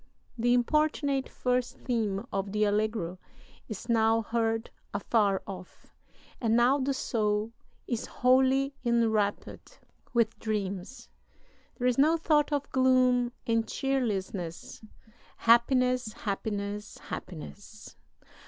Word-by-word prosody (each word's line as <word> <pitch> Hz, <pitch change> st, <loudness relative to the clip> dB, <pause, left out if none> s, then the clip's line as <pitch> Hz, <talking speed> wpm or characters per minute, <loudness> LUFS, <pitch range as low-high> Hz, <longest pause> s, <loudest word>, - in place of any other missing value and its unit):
The 245 Hz, +1 st, +2 dB
importunate 280 Hz, +1 st, +1 dB
first 250 Hz, 0 st, -1 dB
theme 220 Hz, -4 st, -2 dB
of 195 Hz, 0 st, -2 dB
the 210 Hz, 0 st, +2 dB
allegro 205 Hz, -4 st, 0 dB, 0.5 s
is 215 Hz, +2 st, -7 dB
now 225 Hz, -1 st, +3 dB
heard 225 Hz, 0 st, -1 dB, 0.2 s
afar 205 Hz, -1 st, +1 dB
off, 185 Hz, -2 st, -10 dB, 0.5 s
and 225 Hz, -2 st, +2 dB
now 245 Hz, +4 st, +4 dB
the 270 Hz, +1 st, 0 dB
soul 215 Hz, -4 st, -1 dB, 0.3 s
is 235 Hz, -2 st, -3 dB
wholly 265 Hz, +2 st, +3 dB
enwrapped 230 Hz, -, 0 dB, 0.3 s
with 230 Hz, -2 st, +1 dB
dreams. 205 Hz, +1 st, -4 dB, 0.7 s
There 250 Hz, -, -2 dB
is 250 Hz, +1 st, +1 dB
no 315 Hz, +4 st, +5 dB
thought 305 Hz, -2 st, +2 dB
of 285 Hz, -1 st, -1 dB
gloom 255 Hz, -2 st, +3 dB
and 230 Hz, -1 st, +1 dB
cheerlessness. 200 Hz, -10 st, -3 dB, 0.6 s
Happiness! 250 Hz, 0 st, +3 dB
Happiness! 205 Hz, 0 st, -4 dB
Happiness!... 200 Hz, +5 st, -9 dB
230 Hz, 105 wpm, -29 LUFS, 210-255 Hz, 0.7 s, no